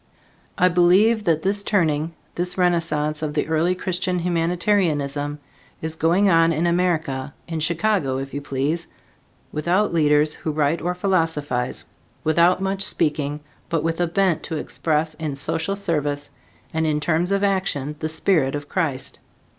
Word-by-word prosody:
I 180 Hz, -, +5 dB
believe 185 Hz, +6 st, +4 dB
that 160 Hz, -2 st, +2 dB
this 200 Hz, +1 st, +1 dB
turning, 165 Hz, -5 st, +1 dB, 0.2 s
this 180 Hz, +1 st, -3 dB
renaissance 160 Hz, -4 st, +1 dB
of 150 Hz, -1 st, -3 dB
the 150 Hz, -, 0 dB
early 160 Hz, +3 st, +1 dB
Christian 185 Hz, 0 st, -1 dB
humanitarianism, 165 Hz, -4 st, 0 dB, 0.4 s
is 160 Hz, 0 st, -4 dB
going 170 Hz, +6 st, +3 dB
on 165 Hz, -2 st, +5 dB
in 165 Hz, +1 st, 0 dB
America, 160 Hz, -6 st, 0 dB
in 165 Hz, -2 st, -3 dB
Chicago, 165 Hz, -3 st, +1 dB
if 135 Hz, 0 st, -5 dB
you 145 Hz, -, -3 dB
please, 145 Hz, +5 st, -2 dB, 0.6 s
without 175 Hz, +6 st, +1 dB
leaders 150 Hz, -1 st, +3 dB
who 155 Hz, -, -4 dB
write 150 Hz, +2 st, +1 dB
or 180 Hz, +2 st, -1 dB
philosophize, 160 Hz, -9 st, -1 dB, 0.4 s
without 170 Hz, +4 st, +4 dB
much 195 Hz, 0 st, -1 dB
speaking, 150 Hz, -5 st, 0 dB, 0.3 s
but 165 Hz, -2 st, 0 dB
with 165 Hz, +1 st, -1 dB
a 175 Hz, -, +2 dB
bent 180 Hz, -1 st, +1 dB
to 160 Hz, -, -4 dB
express 155 Hz, +1 st, -1 dB
in 155 Hz, -3 st, -4 dB
social 160 Hz, +7 st, -2 dB
service 145 Hz, -6 st, -2 dB, 0.4 s
and 160 Hz, 0 st, +1 dB
in 150 Hz, -1 st, +1 dB
terms 170 Hz, +4 st, 0 dB
of 200 Hz, 0 st, +1 dB
action 185 Hz, -8 st, 0 dB
the 155 Hz, -, -2 dB
spirit 155 Hz, -4 st, +1 dB
of 145 Hz, 0 st, -5 dB
Christ. 145 Hz, -8 st, -2 dB
165 Hz, 150 wpm, -22 LUFS, 150-180 Hz, 0.6 s, I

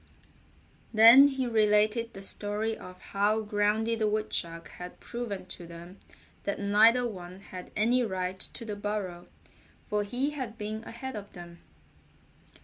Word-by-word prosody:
Then 230 Hz, +5 st, +9 dB
he 270 Hz, -2 st, -2 dB
related 215 Hz, 0 st, +2 dB
the 195 Hz, -, -7 dB
story 210 Hz, +3 st, -1 dB
of 185 Hz, -3 st, -12 dB
how 210 Hz, +2 st, 0 dB
Groundy 210 Hz, +2 st, +1 dB
the 220 Hz, -1 st, 0 dB
Woodchuck 180 Hz, -6 st, -2 dB
had 180 Hz, 0 st, -10 dB
proven 235 Hz, -6 st, -5 dB
to 175 Hz, -, -10 dB
them 170 Hz, +3 st, -11 dB, 0.4 s
that 200 Hz, -, -3 dB
neither 220 Hz, +5 st, +4 dB
one 185 Hz, -3 st, -9 dB
had 185 Hz, -2 st, -9 dB
any 235 Hz, +4 st, +3 dB
right 185 Hz, -3 st, -3 dB
to 230 Hz, -, -3 dB
the 210 Hz, -2 st, -4 dB
burrow, 205 Hz, -4 st, -4 dB, 0.6 s
for 210 Hz, 0 st, +1 dB
he 250 Hz, +8 st, 0 dB
had 255 Hz, -6 st, -6 dB
been 215 Hz, 0 st, -5 dB
ahead 265 Hz, +3 st, -7 dB
of 205 Hz, -1 st, -8 dB
them. 170 Hz, -1 st, -11 dB
210 Hz, 140 wpm, -29 LUFS, 190-230 Hz, 0.6 s, Then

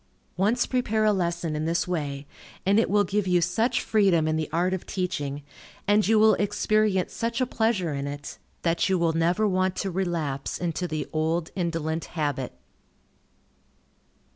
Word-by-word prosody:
Once 215 Hz, +7 st, +2 dB
prepare 220 Hz, -4 st, 0 dB
a 210 Hz, -, +4 dB
lesson 170 Hz, -4 st, -1 dB
in 155 Hz, +1 st, -2 dB
this 165 Hz, +2 st, 0 dB
way, 145 Hz, -5 st, -3 dB, 0.4 s
and 200 Hz, +3 st, +4 dB
it 230 Hz, -, +1 dB
will 205 Hz, +1 st, +4 dB
give 200 Hz, +1 st, -1 dB
you 180 Hz, -1 st, +4 dB
such 225 Hz, +9 st, +1 dB
freedom 190 Hz, -7 st, +3 dB
in 155 Hz, -, +1 dB
the 155 Hz, -1 st, -2 dB
art 175 Hz, +3 st, +1 dB
of 190 Hz, -, -4 dB
teaching, 150 Hz, -7 st, -3 dB, 0.4 s
and 205 Hz, -1 st, +4 dB
you 220 Hz, 0 st, +4 dB
will 215 Hz, 0 st, +6 dB
experience 205 Hz, -2 st, +1 dB
such 230 Hz, +1 st, -2 dB
a 255 Hz, -, +2 dB
pleasure 220 Hz, -9 st, 0 dB
in 140 Hz, 0 st, -3 dB
it, 145 Hz, 0 st, -7 dB, 0.2 s
that 170 Hz, +2 st, +1 dB
you 190 Hz, -, +3 dB
will 170 Hz, -1 st, +1 dB
never 175 Hz, +6 st, +2 dB
want 185 Hz, -1 st, +1 dB
to 195 Hz, -, -2 dB
relapse 165 Hz, -7 st, -2 dB
into 175 Hz, 0 st, -2 dB
the 155 Hz, -2 st, -3 dB
old 160 Hz, +1 st, 0 dB
indolent 165 Hz, -3 st, -2 dB
habit. 145 Hz, -4 st, -1 dB
180 Hz, 165 wpm, -26 LUFS, 160-205 Hz, 0.4 s, will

